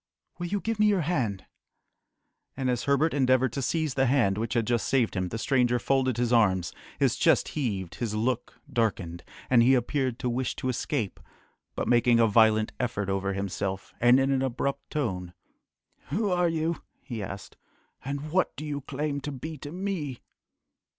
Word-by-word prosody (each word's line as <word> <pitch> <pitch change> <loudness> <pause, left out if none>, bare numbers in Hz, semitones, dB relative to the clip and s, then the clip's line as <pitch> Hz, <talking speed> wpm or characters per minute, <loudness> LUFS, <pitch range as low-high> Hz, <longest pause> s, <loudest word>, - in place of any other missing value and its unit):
"Will 175 - -2
you 205 +3 -1
give 225 -1 -2
me 210 - +5
your 200 -3 +3
hand?" 125 - -1 1.1
And 130 -2 0
as 120 -1 -2
Herbert 140 +3 +2
endeavoured 130 -3 +3
to 135 - -2
seize 155 +2 0
the 135 0 +2
hand 120 -7 +3
which 115 +4 -3
had 115 -2 +2
just 120 -1 0
saved 125 -5 +1
him, 95 0 -1
the 115 - -4
stranger 125 0 +2
folded 130 -1 +1
his 120 0 +1
arms, 95 -7 +3 0.2
his - - +2
chest - - +3
heaved, 100 - -3
his 110 -3 -1
look 120 +2 -2
darkened, 95 -8 -1 0.2
and 125 -2 +5
he 130 +3 +5
appeared 130 -1 0
to 130 - -3
wish 125 +1 -1
to 130 - -3
escape, 125 - -2 0.6
but - - -2
making 120 -1 +4
a 115 - +6
violent 110 0 +4
effort 105 -5 -2
over 95 0 -1
himself, 95 0 -3
and 120 +2 +6
in 135 +1 +2
an 135 -1 +2
abrupt 135 +2 -2
tone, 90 - -3 0.7
"Who 200 - 0
are 180 -1 +2
you?" 165 0 -1 0.2
he 120 -5 -5
asked, 95 0 -7 0.5
"and 140 +3 -4
what 185 +2 +1
do 150 +5 -6
you 145 -1 -3
claim 140 +1 -3
to 145 - -4
be 155 +4 -6
to 145 - -7
me?" 175 -8 -3
130 Hz, 180 wpm, -27 LUFS, 110-145 Hz, 1.1 s, a